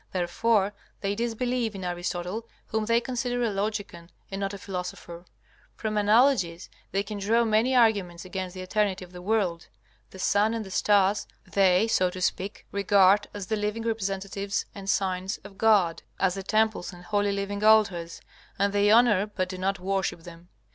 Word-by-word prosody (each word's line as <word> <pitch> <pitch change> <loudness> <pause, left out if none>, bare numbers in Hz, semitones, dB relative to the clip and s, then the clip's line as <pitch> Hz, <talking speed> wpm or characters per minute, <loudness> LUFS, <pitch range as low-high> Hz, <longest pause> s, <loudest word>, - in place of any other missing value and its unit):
Therefore 195 +3 +1 0.3
they 200 0 0
disbelieve 235 0 -1
in 190 - -6
Aristotle, 180 +4 -3 0.2
whom 220 0 -1
they 230 +1 +3
consider 245 0 -2
a 230 - +1
logican 200 -4 -4 0.2
and 195 +1 -4
not 195 0 -1
a 200 - -6
philosopher. 180 -2 -7 0.5
From 215 -1 -3
analogies, 210 -5 +3 0.2
they 195 +1 0
can 205 0 -6
draw 225 +4 +2
many 225 +3 +2
arguments 200 -8 +2
against 185 0 -5
the 185 - -6
eternity 190 -1 0
of 180 - -20
the 180 0 -10
world. 185 -4 0 0.4
The - - -13
sun 205 +4 +2
and 225 -2 -4
the 190 - -10
stars 200 0 +2 0.2
they, 190 +1 +3
so 185 -5 +2
to 185 +1 -8
speak, 185 +2 -2
regard 200 0 +4
as 205 -2 -6
the 220 - -1
living 210 +2 -2
representatives 200 -2 -2
and 195 -1 -7
signs 190 0 0
of 200 -1 -13
God, 200 -7 +3 0.2
as 190 -2 +2
the 195 - -5
temples 215 -1 0
and 175 -1 -13
holy 205 +3 0
living 200 +1 -3
altars, 200 -6 +3 0.4
and 200 +1 +1
they 205 0 +3
honor 215 -3 +5
but 185 -3 -3
do 185 -1 -6
not 195 +1 0
worship 190 -2 -2
them. 170 +1 -13
200 Hz, 175 wpm, -27 LUFS, 185-215 Hz, 0.5 s, honor